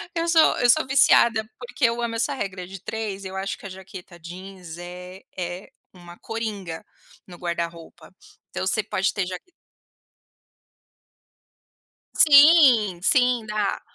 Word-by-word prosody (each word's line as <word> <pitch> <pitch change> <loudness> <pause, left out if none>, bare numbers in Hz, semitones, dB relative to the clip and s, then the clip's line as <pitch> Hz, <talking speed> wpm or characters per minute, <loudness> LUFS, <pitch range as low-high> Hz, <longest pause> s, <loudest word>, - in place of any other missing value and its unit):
Eu 335 0 -2
sou 330 -2 +4
eu 245 - +3
sou 250 - +3
viciada 235 -4 +4
porque 250 +1 -2
eu 235 +1 0
amo 230 -1 -3
essa 265 +5 -1
regra 195 -7 -6
de 195 0 -10
3, 210 -3 -5
eu 190 0 -8
acho 195 +1 -4
que - - -15
a - - -10
jaqueta 185 -2 -12
jeans 180 0 -11
é 180 +2 -10 0.2
é 180 +1 -6 0.2
uma 175 -1 -14
coringa 210 -7 -6 0.4
no 175 -2 -12
guarda-roupa. 170 -1 -6 0.4
Então, 185 - -5
você 215 +3 +1
pode 190 0 -2
ter 195 -3 -3
jaq 180 -1 -7 2.7
Sim, 280 - +6
sim 250 +1 +3
dá. 210 -2 -2
195 Hz, 140 wpm, -23 LUFS, 180-235 Hz, 2.7 s, Sim